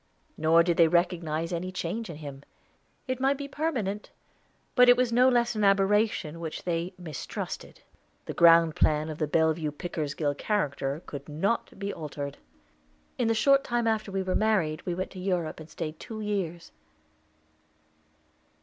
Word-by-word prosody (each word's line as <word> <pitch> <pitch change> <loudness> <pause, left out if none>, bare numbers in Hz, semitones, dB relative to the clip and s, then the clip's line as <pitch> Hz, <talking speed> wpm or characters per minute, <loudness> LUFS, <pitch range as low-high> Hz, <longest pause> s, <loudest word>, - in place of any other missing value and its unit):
Nor 160 +2 +4
did 170 -1 0
they 165 - +7
recognize 165 -1 0
any 180 +2 -3
change 185 +4 -4
in 165 - -6
him. 140 -2 -8 0.7
It 255 -1 -2
might 270 +1 +2
be 280 0 -5
permanent, 250 -10 -2 0.6
but 250 -1 +6
it 245 - +7
was 250 -2 +1
no 250 +2 +6
less 240 -1 +2
an 215 -2 -1
aberration 195 -4 +2
which 160 -2 -5
they 175 +1 -2
mistrusted. 165 -6 -6 0.4
The - - -5
ground 165 -1 +6
plan 155 0 +2
of 155 - -6
the 155 - 0
Bellevue 160 0 +1
Pickersgill 150 -1 -3
character 145 -4 -2
could 140 +1 -8
not 195 +12 -1
be 200 +1 -3
altered. 145 -2 -6 0.8
In 235 -2 +2
a 225 - +2
short 275 +4 +4
time 240 -2 -1
after 220 -2 0
we 195 0 -1
were 185 0 -1
married 185 -9 +1
we 175 - -1
went 185 +1 -4
to 185 - -9
Europe 180 -4 -2
and 155 0 -11
stayed 155 -2 -6
two 220 -1 -7
years. 190 -6 -3
175 Hz, 160 wpm, -28 LUFS, 155-215 Hz, 0.8 s, they